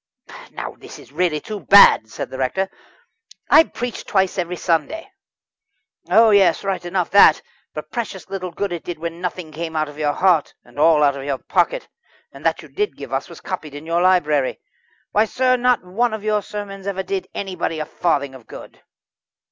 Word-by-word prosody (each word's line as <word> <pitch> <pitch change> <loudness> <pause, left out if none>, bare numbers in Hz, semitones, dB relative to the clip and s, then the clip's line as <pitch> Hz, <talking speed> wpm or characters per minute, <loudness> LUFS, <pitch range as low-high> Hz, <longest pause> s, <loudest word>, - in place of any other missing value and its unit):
"Now - - -6
this - - -11
is - - -16
really 160 0 0
too 210 +6 -7
bad," 195 - +7
said - - -6
the 130 - -7
rector. 190 +9 -1 0.8
"I 320 - +8
preached 245 -4 -6
twice 190 -1 +1
every 180 0 -2
Sunday." 250 - -2 1.0
"Oh, 220 +4 +6
yes 195 -4 +4
right 195 -2 -2
enough 175 0 -2
that. 200 -6 +6 0.3
But 155 0 -7
precious 200 -8 -5
little 185 -2 -5
good 190 +3 -4
it 170 - -5
did 175 - -6
when 170 +1 -6
nothing 180 -3 -5
came 160 +1 -6
out 155 0 0
of 145 +1 -12
your 145 -1 +1
heart, 180 -4 +2
and - - -12
all 155 -1 +5
out 140 -1 +3
of 135 - -7
your 140 -2 -1
pocket - - 0 0.4
and - - -14
that - - 0
you - - -12
did 415 0 -3
give - - -8
us - - -2
was - - -12
copied 150 -2 -6
in 145 +2 -9
your 170 +1 0
library. 155 -7 +2 0.5
Why, 210 +2 +3
sir, 255 +3 +1
not 250 -3 +2
one 220 +5 0
of 215 - -9
your 215 -1 +1
sermons 200 -1 -7
ever 190 -1 -2
did 195 0 -3
anybody 185 -4 -3
a 155 - -3
farthing 140 -6 -1
of 130 -4 -14
good." - - -12
180 Hz, 195 wpm, -20 LUFS, 155-200 Hz, 1.0 s, I